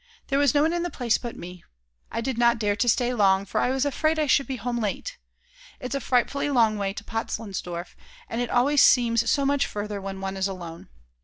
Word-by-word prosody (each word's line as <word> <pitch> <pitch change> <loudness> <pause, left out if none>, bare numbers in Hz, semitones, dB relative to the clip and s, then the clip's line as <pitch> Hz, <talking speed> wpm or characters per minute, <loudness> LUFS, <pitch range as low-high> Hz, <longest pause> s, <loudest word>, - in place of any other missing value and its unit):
There 275 0 +2
was 285 -1 +3
no 290 - +4
one 320 +2 +1
in 345 - -1
the 350 - -2
place 240 -8 0
but 240 -2 -7
me. 180 0 -10 0.5
I - - -2
did 260 +1 -2
not 235 0 +3
dare 205 -2 0
to 240 +3 +1
stay 245 +1 +2
long, 195 -3 +3
for - - -1
I - - +1
was 265 +2 0
afraid 310 +3 0
I 310 - +2
should 275 0 +2
be 265 - -3
home 240 +1 -3
late. 230 - -4 0.6
It's 250 -3 -5
a 275 - 0
frightfully 265 +4 0
long 225 -6 +3
way 195 -1 -1
to 195 - -8
Potzleinsdorf, 195 -6 -5 0.3
and 235 - -3
it 245 - -2
always 275 +4 +3
seems 230 -2 +4
so 280 -1 +2
much 280 0 +1
further 205 -1 -5
when 195 0 -6
one 195 0 -4
is 190 0 0
alone. 170 - -8
235 Hz, 230 wpm, -25 LUFS, 200-275 Hz, 0.6 s, no